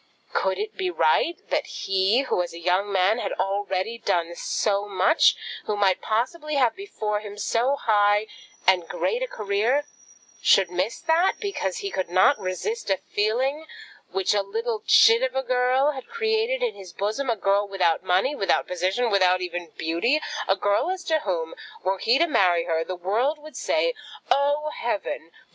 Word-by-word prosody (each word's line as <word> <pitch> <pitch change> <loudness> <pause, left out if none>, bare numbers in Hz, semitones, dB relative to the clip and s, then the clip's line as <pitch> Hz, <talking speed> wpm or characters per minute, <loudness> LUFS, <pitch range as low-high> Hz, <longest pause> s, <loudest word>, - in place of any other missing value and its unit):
Could - - 0
it 425 +1 -4
be 375 -1 -2
right 345 -2 +2
that - - 0
he 195 +5 +1
who, 260 -9 0
as 175 - -5
a - - -8
young 185 +4 0
man, 195 +4 +2
had - - -3
already 195 +3 -2
done 170 -4 -1
so 200 +3 -1
much, 195 - +4 0.3
who 210 - -1
might 195 -2 +2
possibly 295 +8 -2
have 255 -4 +2
before 215 - -3
him 205 -1 -9
so 235 +6 +1
high 205 -4 +2 0.4
and 180 -3 +3
great 475 - -1
a - - -1
career, 220 - 0 0.6
should 190 -3 +4
miss 185 +5 -2
that, 340 +2 +2
because 405 +3 -3
he 395 - -3
could 185 -2 -3
not 185 +9 +4
resist 205 - -4
a 195 - +2
feeling 260 +9 0 0.4
which 190 +1 0
a 205 - +2
little 220 +2 -3
chit 455 +1 +6
of - - -1
a 265 - 0
girl 255 +3 +2
had 265 -3 -9
created 460 +2 0
in 475 -3 0
his 185 -3 -11
bosom, 220 +9 -2
a 230 - +2
girl 200 0 +1
without 180 -4 +1
money, 190 +9 +1
without 195 -9 +1
position, 190 +7 -1
without 185 -2 +3
even 175 -2 -5
beauty; 170 - +1 0.3
a 195 - +3
girl 205 - +1
as 375 -1 -3
to 315 -1 +1
whom, 170 - -3 0.3
were 190 +1 0
he 235 +4 +3
to 335 - +4
marry 180 - +3
her, 165 -1 -1
the 185 +2 -5
world 220 - 0
would 305 +1 -13
say, - - 0 0.4
"Oh, 290 +2 +2
heaven! 205 -7 -3
210 Hz, 175 wpm, -24 LUFS, 190-290 Hz, 0.6 s, chit